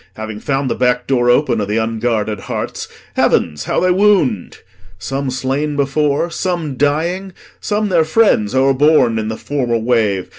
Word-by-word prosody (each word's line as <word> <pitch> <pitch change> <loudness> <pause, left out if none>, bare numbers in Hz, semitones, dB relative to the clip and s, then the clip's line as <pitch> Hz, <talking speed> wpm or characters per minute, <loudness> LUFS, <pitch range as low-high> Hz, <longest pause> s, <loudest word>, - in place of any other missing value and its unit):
Having 110 -1 -6
found 135 +2 -1
the - - 0
back 125 -1 0
door 120 -3 +1
open 120 -3 +2
Of 100 - -2
the 105 +2 -1
unguarded 110 -2 -1
hearts, - - -5 0.3
heavens, 75 -3 +1
how - - 0
they 185 - +2
wound! 180 - +2 0.4
Some 135 +9 -3
slain 135 +3 -2
before, 145 +3 0
some 170 -7 -3
dying, 170 +8 -1 0.3
some 210 0 -1
their 170 -3 +3
friends 155 - +2
O'erborne 135 -3 +3
i' 110 0 -3
th' - - -13
former 125 -5 -1
wave. 110 -5 0
130 Hz, 155 wpm, -16 LUFS, 110-155 Hz, 0.4 s, their